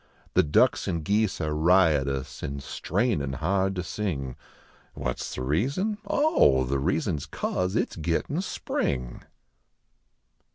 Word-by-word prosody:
The - - +6
ducks 75 - +3
and 85 -2 -1
geese 105 +1 +1
are 75 -1 -1
riotous, 75 -6 +2
an 70 - -4
strainin 75 - -1
hard 95 +4 0
to 90 - -2
sing. 75 -11 -3 0.6
What 60 -1 -3
s - - -5
the 65 - -4
reason? 140 - 0
Oh, 290 - +4
the 70 +2 -1
reason 80 +2 0
s 75 +2 -7
cause 90 +5 -2
it - - +1
s - - -10
gittin 85 - -1
spring. 65 - -3
80 Hz, 135 wpm, -27 LUFS, 70-100 Hz, 0.6 s, The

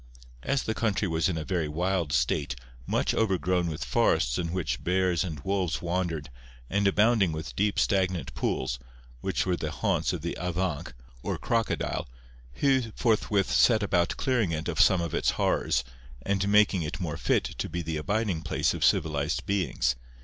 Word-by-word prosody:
As 140 - 0
the 110 - -1
country 110 -3 0
was 80 +1 +1
in 85 - -2
a 80 - -3
very 85 -3 -1
wild 85 0 -1
state, 65 +1 0 0.3
much - - +1
overgrown 90 -4 +1
with 80 -2 -4
forests - - +2
in 85 -2 -2
which 75 -9 -2
bears 90 -1 +2
and 80 -5 -5
wolves 90 -7 -1
wandered, 85 -4 -2 0.4
and 100 +1 +2
abounding 105 -2 +3
with 80 +1 -6
deep 105 +1 +1
stagnant 90 -8 +1
pools, - - -2 0.4
which - - -1
were 90 -1 +1
the 80 - -3
haunts - - 0
of - - -4
the - - -3
avanc 90 -5 -2 0.3
or - - -2
crocodile, 115 - -1 0.4
Hu 130 - +2
forthwith 105 -4 +1
set 110 -3 +4
about 90 -4 +1
clearing 120 -9 +1
it 80 -1 -3
of - - +1
some 95 -2 +5
of 85 -3 -3
its - - +1
horrors, 65 - +1 0.4
and 100 +3 0
making 105 -3 +4
it 85 +4 -4
more 85 -5 -3
fit - - +1
to - - -4
be 85 +2 -3
the 80 0 -3
abiding 100 +1 -1
place - - 0
of - - -3
civilized 75 0 +1
beings. 90 -9 0
90 Hz, 170 wpm, -28 LUFS, 80-100 Hz, 0.4 s, some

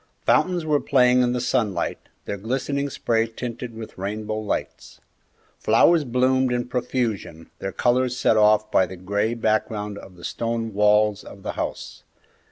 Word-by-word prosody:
Fountains 180 -3 +2
were 150 -2 +2
playing 125 -3 +4
in 125 0 +2
the 125 - -1
sunlight, 120 -5 -1 0.3
their - - -3
glistening 135 +6 -2
spray 115 -3 0
tinted 115 0 -6
with 110 -4 -9
rainbow 105 +2 -3
lights. 105 -1 -5 0.6
Flowers 150 +8 +4
bloomed 130 +1 +2
in 120 0 -1
profusion, 115 -10 -3
their 95 - -4
colors 125 +2 +1
set 110 - +3
off 105 0 +4
by 95 - +3
the 95 +1 -9
gray 100 +5 -1
background 110 -2 -1
of 95 - -13
the 85 - -15
stone 115 -1 -3
walls 105 0 +3
of 100 - -12
the - - -3
house. - - -5
115 Hz, 155 wpm, -23 LUFS, 105-125 Hz, 0.6 s, playing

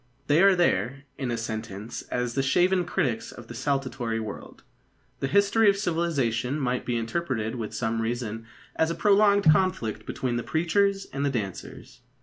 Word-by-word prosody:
They 150 +4 +4
are 195 -1 +6
there, 140 -6 +1 0.2
in 130 -3 -2
a 120 - -1
sentence, 110 -1 -5
as 125 -1 -1
the 135 - +1
shaven 180 +6 +2
critics 140 -11 -1
of 120 -2 -12
a - - -6
saltatory 130 -3 -2
world. 110 -2 -8 0.6
The 135 - -1
history 200 +7 +4
of 200 - +2
civilisation 150 - 0
might 125 -2 -1
be 120 -1 0
interpreted 115 -2 -2
with 115 -4 -4
some 115 0 -1
reason 115 -1 -3 0.3
as 160 - +2
a 165 - -2
prolonged 205 0 +4
conflict 155 - 0
between 125 -2 -2
the - - -1
preachers 195 +5 +1
and 140 +1 -2
the 140 - +2
dancers. 105 -8 -6
135 Hz, 165 wpm, -26 LUFS, 115-175 Hz, 0.6 s, are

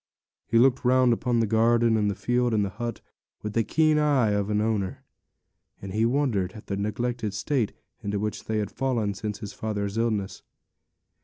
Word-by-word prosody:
He 115 - +2
looked 130 +2 +4
round 125 -1 +4
upon 120 0 0
the - - +2
garden, 115 +1 +3
and 105 -2 +2
the 100 - -2
field, 120 0 +1
and 105 -1 +2
the - - -3
hut, 115 +3 -5 0.4
with 105 -1 -4
the 115 - +2
keen 155 +4 +3
eye 140 -7 +3
of 100 0 0
an 105 0 +1
owner; 105 -3 -1 0.8
and 95 -1 -7
he 110 +2 +2
wondered 120 -9 0
at 105 - -11
the 100 - -3
neglected 110 +1 -2
state 120 -1 0 0.3
into 100 0 -2
which 105 +1 -3
they 110 - -1
had 105 -1 -2
fallen 120 -6 -1
since 105 +1 -4
his 100 -1 -6
father's 105 -1 -3
illness. 110 -4 -1
110 Hz, 185 wpm, -26 LUFS, 105-120 Hz, 0.8 s, looked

